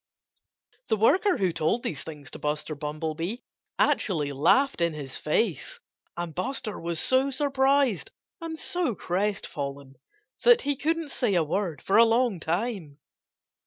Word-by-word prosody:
The 220 Hz, -, +2 dB
worker 370 Hz, -, +3 dB
who 185 Hz, -3 st, +1 dB
told 165 Hz, +9 st, 0 dB
these 150 Hz, -, -3 dB
things 145 Hz, -5 st, -9 dB
to -, -, -8 dB
Buster 150 Hz, +1 st, -2 dB
Bumblebee 155 Hz, +6 st, -4 dB, 0.4 s
actually 150 Hz, -8 st, +1 dB
laughed 175 Hz, -, +3 dB
in 170 Hz, -1 st, +2 dB
his 140 Hz, -3 st, -7 dB
face. 160 Hz, -, -1 dB, 0.4 s
And 175 Hz, -2 st, -4 dB
Buster 215 Hz, -, -3 dB
was 170 Hz, -1 st, -3 dB
so 260 Hz, +1 st, +2 dB
surprised 270 Hz, -, +2 dB, 0.3 s
and 325 Hz, -1 st, -5 dB
so 340 Hz, -, 0 dB
crestfallen 145 Hz, -9 st, -3 dB, 0.5 s
that 480 Hz, 0 st, +6 dB
he 285 Hz, 0 st, 0 dB
couldn't 320 Hz, +2 st, -1 dB
say 215 Hz, -8 st, 0 dB
a 170 Hz, -, +3 dB
word 165 Hz, -1 st, -2 dB
for 195 Hz, -, +3 dB
a 230 Hz, -, +9 dB
long 230 Hz, -3 st, +2 dB
time. 170 Hz, -3 st, -3 dB
190 Hz, 140 wpm, -27 LUFS, -, 0.5 s, a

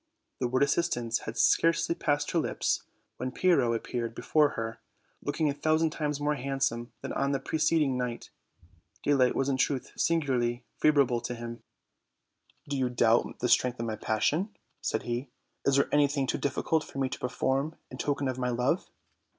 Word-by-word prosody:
The 125 Hz, -, +1 dB
word 130 Hz, +3 st, +2 dB
assistance 140 Hz, -6 st, +1 dB
had 115 Hz, +1 st, -5 dB
scarcely 165 Hz, +5 st, +3 dB
passed 145 Hz, -3 st, 0 dB
her 170 Hz, -, +2 dB
lips, -, -, 0 dB, 0.4 s
when 130 Hz, +1 st, -3 dB
Pyrrho 140 Hz, -6 st, +3 dB
appeared 115 Hz, 0 st, -3 dB
before 150 Hz, -2 st, +2 dB
her, 115 Hz, 0 st, -4 dB, 0.4 s
looking 155 Hz, +2 st, 0 dB
a 145 Hz, -, +1 dB
thousand 155 Hz, +2 st, +2 dB
times 150 Hz, -2 st, -2 dB
more 145 Hz, +1 st, +1 dB
handsome 135 Hz, -4 st, -2 dB
than -, -, -4 dB
on 140 Hz, +1 st, 0 dB
the 135 Hz, -, +1 dB
preceding 155 Hz, -2 st, +1 dB
night. 125 Hz, -1 st, -4 dB, 0.7 s
Daylight 135 Hz, -3 st, +3 dB
was 135 Hz, -, +1 dB
in 135 Hz, -2 st, +1 dB
truth 130 Hz, -1 st, 0 dB
singularly 125 Hz, -7 st, +1 dB
favorable 140 Hz, -6 st, +3 dB
to 120 Hz, +1 st, -4 dB
him. 115 Hz, 0 st, -7 dB, 1.1 s
"Do 145 Hz, -, -2 dB
you 130 Hz, -1 st, +1 dB
doubt 120 Hz, -1 st, +2 dB
the 125 Hz, -, +2 dB
strength 125 Hz, 0 st, +3 dB
of 115 Hz, -, -2 dB
my 110 Hz, -1 st, -2 dB
passion?" 150 Hz, -, 0 dB, 0.3 s
said 110 Hz, -, -1 dB
he; 120 Hz, +2 st, -3 dB, 0.4 s
"is 140 Hz, -, +4 dB
there 140 Hz, -, +4 dB
anything 145 Hz, -1 st, +3 dB
too -, -, -1 dB
difficult 150 Hz, +3 st, 0 dB
for -, -, -11 dB
me 135 Hz, -1 st, +1 dB
to -, -, -6 dB
perform 135 Hz, +4 st, -1 dB, 0.2 s
in 130 Hz, -, -8 dB
token 145 Hz, -1 st, 0 dB
of 130 Hz, 0 st, -2 dB
my 125 Hz, -1 st, 0 dB
love?" 125 Hz, +9 st, 0 dB
135 Hz, 175 wpm, -29 LUFS, 120-145 Hz, 1.1 s, is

